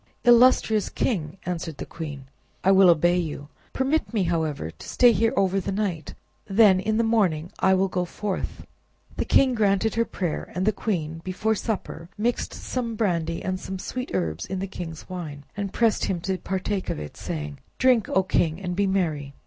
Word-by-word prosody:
"Illustrious 240 -3 +5
king!" 170 - -2
answered 165 -4 -4
the - - -5
queen, 145 -5 -7 0.4
"I 195 - +5
will 190 -1 +7
obey 175 +2 +4
you. 150 -3 -5 0.2
Permit 275 +4 0
me, 205 - +2
however, 160 - -1
to - - -12
stay 245 -1 +6
here 225 0 +2
over 195 0 +2
the 195 - -3
night, 190 -7 -3 0.3
then 200 -2 +5
in 215 +3 0
the 230 - +3
morning 185 -8 +1
I 190 0 +4
will 190 +1 +2
go 185 -1 -1
forth." 200 +2 -4 0.5
The - - 0
king 265 -2 +4
granted 210 -1 +2
her 230 - +2
prayer; 175 -8 -4
and 185 +1 0
the 215 - +4
queen 165 -7 -3
before 210 +4 0
supper 195 -6 -4
mixed 235 +3 -1
some 235 -3 -4
brandy 170 -6 -1
and 185 -1 -2
some 190 - -5
sweet 250 +7 -5
herbs 80 +2 -2
in 190 - -3
the 190 - -2
king's 170 -4 -7
wine, 160 -6 -6
and 200 -1 -3
pressed 230 0 +2
him 185 -3 -1
to 190 +1 -2
partake 190 +1 -2
of - - -2
it, 75 -1 -7
saying— 75 -2 -5 0.2
"Drink, 255 -5 +3
O 190 - +3
king, 170 -3 +1
and 180 -2 -3
be 200 +1 +2
merry. 155 -8 -1
190 Hz, 190 wpm, -25 LUFS, 165-215 Hz, 0.5 s, will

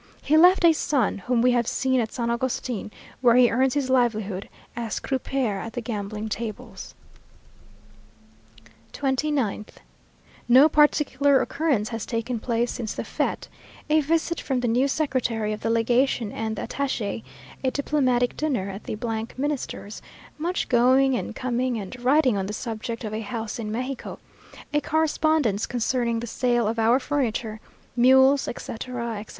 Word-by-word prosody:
He 300 - +2
left 355 +3 +6
a 330 - +7
son, 275 -9 0
whom 235 +4 0
we 250 - +5
have 240 -2 +1
seen 260 -1 +1
at 225 -2 -1
San 235 -2 -2
Agustin, 240 -3 -2 0.3
where 240 -2 +5
he 245 -1 +6
earns 260 +2 +2
his 285 -3 0
livelihood 220 -7 0 0.3
as 230 -2 -3
croupier 260 -5 -2
at 225 +3 -7
the - - -3
gambling 215 -1 -4
tables. 220 0 -6 2.0
29th. 265 -6 -1 0.7
No 260 +5 +8
particular 285 -2 +3
occurrence 280 -9 0
has 225 -3 -5
taken 230 0 -2
place 235 +1 -1
since 225 -3 -4
the - - -3
fête; - - -2 0.4
a 310 0 +5
visit 330 +3 0
from 260 -3 -1
the 245 - 0
new 245 +4 +2
Secretary 250 -7 -1
of 215 - -7
Legation 230 0 +1
and 220 0 -3
the - - -5
Attache, 235 -6 -3 0.4
a 260 - +2
diplomatic 255 -3 +1
dinner 250 -11 -1
at 195 +2 -9
the 215 - -4 0.4
Minister's, 265 -6 -4 0.4
much 350 +4 -1
going 260 +2 +4
and - - -4
coming 250 -1 -1
and 225 +4 -7
writing 260 -2 +4
on 190 -1 -2
the 210 - -4
subject 230 +1 -5
of 215 -1 -4
a 220 - -3
house 225 0 -5
in 215 -2 -4
Mexico, 255 +3 -4 0.6
a 295 - +2
correspondence 310 -8 +1
concerning 240 -1 0
the - - -4
sale 240 -1 0
of 225 +1 -2
our 230 +3 +4
furniture, 240 -6 -2 0.4
mules, 265 +3 +5
etc., 240 +1 -5
etc. 210 - -8
245 Hz, 150 wpm, -24 LUFS, 225-270 Hz, 2.0 s, No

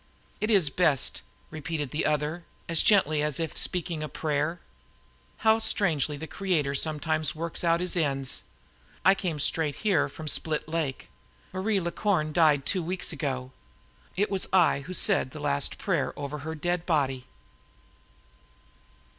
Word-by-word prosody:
"It 215 - -1
is 190 -10 +4
best," 155 -6 +2 0.3
repeated 155 -2 -4
the 150 - 0
other, 150 +3 -1 0.2
as 165 -1 +2
gently 155 -8 +4
as 150 -1 0
if 165 -1 -3
speaking 175 -3 0
a 155 - -4
prayer. 155 +2 -1 0.9
"How 220 0 +6
strangely 170 -10 +1
the 160 - -6
Creator 160 -6 -1
sometimes 155 +1 0
works 165 +2 -2
out 170 0 +3
His 180 0 +1
ends! 135 -5 0 0.6
I 190 - +8
came 180 -5 -3
straight 150 0 0
here 185 -9 +3
from 155 +3 -9
Split 155 +1 +1
Lake. 155 -4 -3 0.4
Marie 200 +2 0
La 170 -1 -2
Corne 170 -6 0
died 150 -5 +4
two 185 - 0
weeks 180 +3 -3
ago. 130 -4 -3 0.6
It 205 +4 0
was 195 -2 0
I 180 -6 +4
who 155 +6 -7
said 195 -11 +2
the 155 - -9
last 145 -1 0
prayer 190 -5 -1
over 145 +1 -5
her 160 +3 -5
dead 175 +2 -2
body!" 135 -6 0
160 Hz, 150 wpm, -27 LUFS, 145-180 Hz, 0.9 s, I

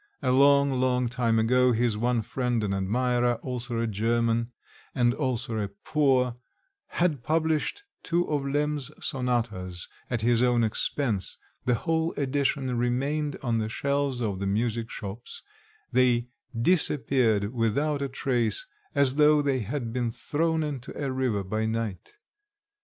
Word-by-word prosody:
A - - +2
long, 140 +1 +5
long 125 -1 +2
time 120 -2 +1
ago, 125 +3 +4
his 115 -1 +1
one 120 +1 0
friend 120 -1 -1
and 100 -2 -1
admirer, 120 +5 +1
also 120 -2 -3
a 115 - +1
German 115 +2 0 0.4
and 120 -1 +3
also 120 -6 -2
poor, 130 -5 +2 0.5
had 165 -7 0
published 160 - 0 0.2
two 175 +1 0
of 150 -2 0
Lemm's 145 0 -1
sonatas 115 - -2 0.2
at 120 -3 -1
his 120 +1 +3
own 120 -2 +3
expense 110 -1 -1 0.3
the 125 - +3
whole 160 +6 0
edition 135 -2 0
remained 140 +5 0
on 115 -3 +1
the 110 0 -2
shelves 140 0 -1
of 100 -5 -2
the 100 - -2
music 115 +2 -1
shops; 105 +3 -8 0.5
they 125 -1 +3 0.3
disappeared 120 - +2
without 140 +6 0
a 140 - -1
trace, 120 -4 0 0.3
as 140 -1 +2
though 150 0 +5
they 135 -2 +1
had 120 +1 -4
been 120 -2 0
thrown 160 +7 -1
into 140 -5 -5
a 140 -2 -1
river 125 -6 0
by 110 +4 -1
night. 110 - -4
125 Hz, 140 wpm, -27 LUFS, 115-140 Hz, 0.5 s, long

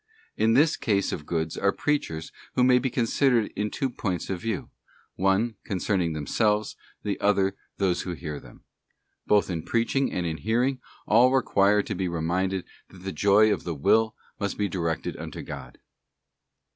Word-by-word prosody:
In 110 +1 +3
this 150 +4 +4
class 100 -3 +1
of 75 - -5
goods 80 -1 -1
are 100 - +2
Preachers 80 - -2 0.2
who 125 - +4
may 125 0 +6
be 130 +1 -1
considered 120 -1 +2
in 105 +1 -1
two 135 - -1
points 100 -8 -3
of 90 - -3
view: 110 -4 -3 0.4
one, 95 +4 +1
concerning 90 -3 0
themselves, 105 +8 0 0.3
the 105 - -2
other, 100 -1 +2 0.2
those 95 -3 +1
who 90 - -4
hear 75 -3 -6
them. - - -16 0.6
Both 105 -1 +4
in 85 -2 -2
preaching 120 - 0
and 90 - -2
in 80 -1 -2
hearing, 120 - 0 0.3
all 120 +4 +5
require 105 -6 +3
to - - -4
be 95 -1 -2
reminded 90 +3 -1 0.2
'that 95 -1 -15
the 95 - -3
joy 105 +5 +4
of - - -4
the 85 -2 -3
will 110 +10 +3 0.2
must 100 -1 -2
be 105 - +1
directed 85 -3 -2
unto - - -7
God. - - -8
100 Hz, 170 wpm, -26 LUFS, 90-115 Hz, 0.6 s, may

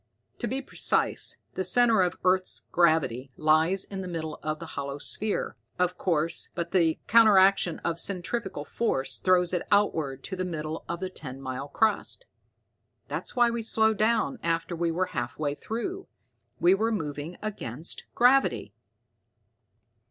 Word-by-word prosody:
To 240 - -2
be 265 +4 -3
precise, - - +1 0.2
the 190 - -2
center 225 +3 +5
of 180 -1 +1
the - - -21
earth's 185 0 +1
gravity 155 -7 +2
lies 160 +5 +2
in 195 -1 -6
the 185 - -6
middle 160 -3 -5
of 155 0 -2
the 165 - -8
hollow 140 0 -4
sphere, 205 +8 -1 0.2
of 180 0 +1
course, 165 -2 0
but 170 -1 -3
the 165 -4 +2
counteraction 195 -6 +5
of 170 0 -1
centrifugal 185 -4 -3
force 135 - -2
throws 180 -1 +2
it 180 - 0
outward 160 -10 +1
to 190 - -5
the 185 - -2
middle 160 -3 -4
of 170 +1 -4
the 185 - -2
ten 135 -6 -8
mile 130 +1 -5
crust. 220 - 0 0.8
That's - - -5
why 240 -1 +4
we 235 0 -2
slowed 220 -1 +2
down 235 +4 +1
after 165 +1 -1
we 170 0 0
were 175 +3 0
half 120 0 -3
way 145 -2 -1
through. 295 - -5 0.5
We 175 +2 +5
were 220 +4 +1
moving 155 -3 -4
against 170 - -4
gravity." 240 - +3
180 Hz, 155 wpm, -27 LUFS, 155-215 Hz, 0.8 s, center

